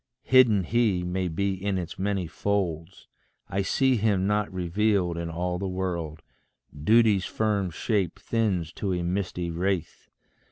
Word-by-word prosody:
Hidden 120 -7 +5
He 105 -3 +1
may 90 +1 -1
be 95 +4 -1
in 95 +1 -2
its 85 -1 -5
many 100 -1 -1
folds 90 -1 -3 0.4
I 95 - -1
see 130 +6 +2
him 100 -3 +1
not 105 0 0
revealed 95 0 0
in 85 0 -4
all 90 +2 -2
the 100 - -2
world 90 -4 -3 0.5
Duty's 105 +5 +3
firm 105 -4 0
shape 95 0 -1
thins 100 -8 -1
to 95 -3 -2
a 90 -1 -1
misty 90 -1 -2
wraith. 90 0 -2
95 Hz, 145 wpm, -26 LUFS, 90-105 Hz, 0.5 s, Hidden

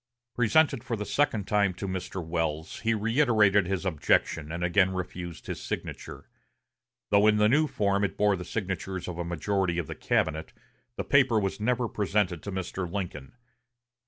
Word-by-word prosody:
Presented 125 +2 +3
for 120 - -2
the 105 -1 -4
second 115 -8 0
time 100 -3 +2
to 100 - -5
Mr. 95 -1 -4
Welles, 80 -1 -2
he 115 0 +1
reiterated 110 -4 +3
his 95 0 -2
objection, 80 -2 +1
and 85 +1 -3
again 95 +2 +3
refused 90 -2 -6
his - - -5
signature. - - -6 0.8
Though 100 +1 +5
in 105 0 +4
the 105 0 +4
new 150 +7 +3
form 100 -5 0
it 100 - -2
bore 105 -1 +3
the 90 - -6
signatures 95 -1 -4
of 90 -1 -5
a - - -1
majority 85 +2 -1
of 85 - -1
the - - -6
cabinet, 80 +2 -1 0.4
the - - -2
paper 130 -5 +4
was 95 0 -2
never 120 +2 +1
presented 100 -5 0
to 100 - -6
Mr. 95 -1 -4
Lincoln. 90 - -5
100 Hz, 170 wpm, -28 LUFS, 90-105 Hz, 0.8 s, Though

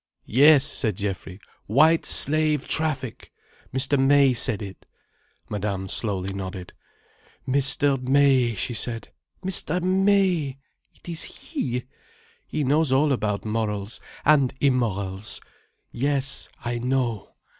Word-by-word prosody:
"Yes," 140 +3 +6
said 110 -7 0
Geoffrey. 95 -2 -5 0.3
"White 155 +9 +4
Slave 155 -1 +2
Traffic! 140 -7 -2 0.4
Mr. 135 +2 +1
May 135 0 +5
said 115 -3 +1
it." 95 -2 -10 0.6
Madame 100 -2 -3
slowly 95 -2 -1
nodded. 95 -2 -7 0.7
"Mr. 135 0 +2
May!" 130 -3 +3
she 120 - -2
said. 115 0 -3 0.4
"Mr. 180 -2 -1
May! 185 -6 +2 0.4
It - - -21
is 170 -2 -4 0.3
he. 125 - -2 0.6
He 150 - -2
knows 145 +2 +2
all 145 +3 +3
about 105 -6 -1
morals—and 110 +6 0
immorals. 105 -7 -1 0.5
Yes, 140 +1 0 0.2
I 120 0 -2
know. 125 -4 -2
130 Hz, 105 wpm, -24 LUFS, 105-145 Hz, 0.7 s, Yes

